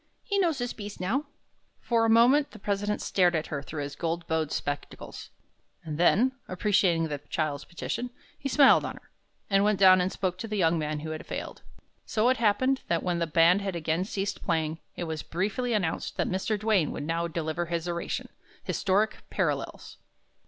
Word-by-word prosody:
He 400 -1 0
knows 335 -6 +2
his 245 -1 -3
'piece' 205 -1 -8
now." 230 +11 0 0.5
For 230 -1 +1
a - - +2
moment, 250 +6 +5
the - - -12
president 205 0 -2
stared 180 -3 +3
at 160 - 0
her 140 - -2
through 145 +1 -5
his 145 0 -6
gold 170 0 -2
bowed 160 -2 -1
spectacles, 145 0 -5 0.5
and 155 -2 -5
then, 220 +9 +4 0.2
appreciating 180 -3 +2
the 145 -2 -4
child's 155 -3 -2
petition, 240 +7 -4 0.3
he 275 - -3
smiled 275 0 +6
on - - -4
her, - - -17 0.4
and 195 -1 +3
went 210 -2 +2
down 185 -1 +7
and 180 +1 0
spoke 185 -1 -2
to 225 - -4
the 215 -1 -3
young 165 -3 +3
man 150 -1 -2
who 155 +1 -5
had 155 - -6
failed. - - -6 0.4
So 220 +3 +1
it 260 - +2
happened 240 +5 +2
that 170 -1 0
when 175 -2 0
the 170 - 0
band 165 +4 +4
had 195 -2 -3
again 165 +1 0
ceased 200 0 -3
playing, 160 0 -1 0.2
it - - -4
was 160 -2 -3
briefly 205 +8 -2
announced 195 -8 -1
that - - +1
Mr. 195 +3 -1
Duane 205 -7 +2
would - - -5
now 165 +2 -1
deliver 165 +1 -3
his 170 0 -2
oration, 170 0 -3 0.3
"Historic 205 +3 +1
Parallels." - - -2
185 Hz, 190 wpm, -28 LUFS, 165-215 Hz, 0.5 s, down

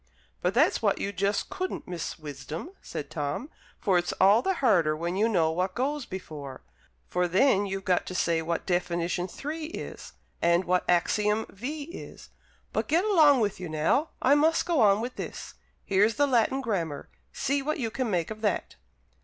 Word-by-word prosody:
"But - - 0
that's - - +3
what - - +2
you 200 - -2
just 200 +3 -1
couldn't, 370 0 -4
Miss 175 -3 -5
Wisdom," 150 - -7
said - - -6
Tom. 165 - -3 0.3
"For 190 -4 +3
it's 175 - -2
all 200 +4 +5
the 385 +7 0
harder 175 - +3
when 170 +3 -2
you 215 +4 +2
know 165 -7 +2
what 185 +3 -1
goes 275 +2 -1
before; 155 -8 -8 0.4
for 180 0 0
then 200 +2 +3
you've 195 0 -4
got 180 -1 +1
to 185 - -5
say 170 -2 +1
what 165 +1 -2
definition 175 0 -1
3 310 +9 -5
is, 325 - -8 0.3
and 170 +2 +3
what 180 0 +1
axiom 210 +5 +2
V 285 +9 -5
is. 335 +5 -10 0.4
But - - -1
get 335 +6 +2
along 310 - +5
with 205 -4 -1
you 180 -3 -5
now; 155 - +1
I 265 - +6
must 315 +3 +3
go 335 -7 +2
on 205 0 +5
with 245 +2 -5
this. - - -6 0.3
Here's 205 +3 +3
the 290 - +3
Latin 260 0 +2
Grammar. 170 - -2 0.2
See 280 +1 0
what 305 +2 -2
you 230 -4 -2
can 255 -1 -2
make 175 -1 -1
of 215 0 -7
that." 210 -3 -1
200 Hz, 185 wpm, -27 LUFS, 175-270 Hz, 0.4 s, I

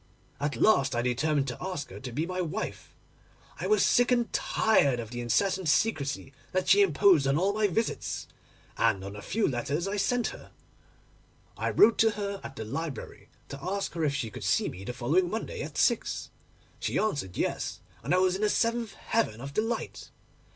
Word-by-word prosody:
At 145 -2 -1
last 135 - +3
I 120 - 0
determined 140 +3 +1
to 120 - -7
ask 185 -6 -4
her - - -8
to 130 -2 -7
be 150 +7 -1
my 185 +1 -3
wife: 180 +5 -5 0.6
I - - -2
was 430 - +4
sick 245 +1 +3
and 240 -2 +1
tired 140 - +2
of 115 -1 -6
the 120 0 -4
incessant 185 - +1
secrecy 140 -8 0 0.2
that 185 0 0
she 200 +1 +6
imposed 180 -4 +4
on 135 +1 +2
all 195 +4 +2
my 215 0 +2
visits, 220 +5 -2 0.5
and 95 - +2
on 100 +1 -6
the 105 - -8
few 210 - 0
letters 140 +7 -1
I 205 +1 -2
sent 240 +4 +1
her. - - -11 1.1
I - - -1
wrote 225 +2 +5
to 225 - +6
her 200 -1 -3
at 135 - -8
the 110 - -5
library 155 +5 -6 0.2
to 140 - -8
ask 195 +2 -2
her 165 -1 -2
if 145 -2 +1
she 115 -6 -3
could - - -8
see - - +2
me 95 - -9
the 110 - -4
following 150 +9 +1
Monday 220 +3 -4
at - - -6
six. - - +1 0.5
She - - -1
answered 140 - -1
yes, - - -2 0.2
and - - -4
I 180 - +5
was 185 0 +3
in 195 - -4
the 210 - +3
seventh 230 -1 0
heaven 220 - -1
of 140 +3 -7
delight. 225 +4 -3
170 Hz, 195 wpm, -28 LUFS, 135-205 Hz, 1.1 s, she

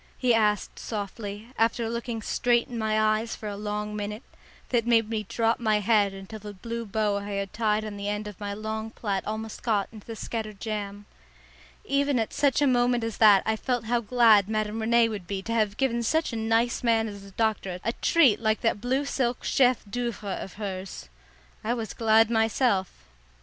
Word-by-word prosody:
he 250 -2 +3
asked 210 -2 +1
softly, 205 0 -5
after 230 0 +2
looking 235 -1 -4
straight 240 +1 +1
in 245 - -8
my 220 -1 0
eyes 215 +1 +1
for 215 - -7
a 205 - -4
long 210 +1 -4
minute, 210 +3 -4 0.5
that 235 -2 +1
made 230 -2 +4
me 215 -2 -3
drop 230 0 +1
my 215 -3 +2
head 205 -1 +3
until 195 +3 -9
the 205 0 -9
blue 230 +4 -5
bow 210 0 0
I 200 0 -5
had 200 0 -3
tied 215 -1 +1
on 210 -1 -6
the 200 0 -4
end 210 0 -3
of 210 -3 -9
my 205 -1 -4
long 220 +1 -4
plait 200 -4 -2
almost 220 +1 -5
got 210 -4 0
into 215 -2 -13
the 225 - -6
scattered 215 -2 -5
jam. 205 -2 -4 0.8
Even 280 0 +1
at 225 -2 -1
such 285 -1 +2
a - - +5
moment 245 -2 +2
as 225 -1 -3
that 210 -3 +7
I 220 - +1
felt 245 +1 -2
how 240 +1 +1
glad 220 -3 +5
Madame 215 0 -1
Rene 230 +1 +4
would 210 -2 -4
have 175 - -22
been 195 0 -3
to 230 - -3
have 215 -2 +1
given 245 -3 +1
such 315 +4 0
a - - -2
nice 225 +2 +1
man 225 -2 +2
as 200 -2 -8
the 200 - -12
doctor 200 -3 -1
a 230 - 0
treat 280 -8 +4
like 220 -1 +1
that 225 -3 0
blue 260 +4 0
silk 250 -3 -1
chef 250 -3 +3
d'oeuvre 235 -1 -4
of 190 - -6
hers. 190 - -6 0.5
I 235 +3 0
was 225 -2 -5
glad 225 0 +4
myself. 225 -3 +2
220 Hz, 200 wpm, -27 LUFS, 210-235 Hz, 0.8 s, that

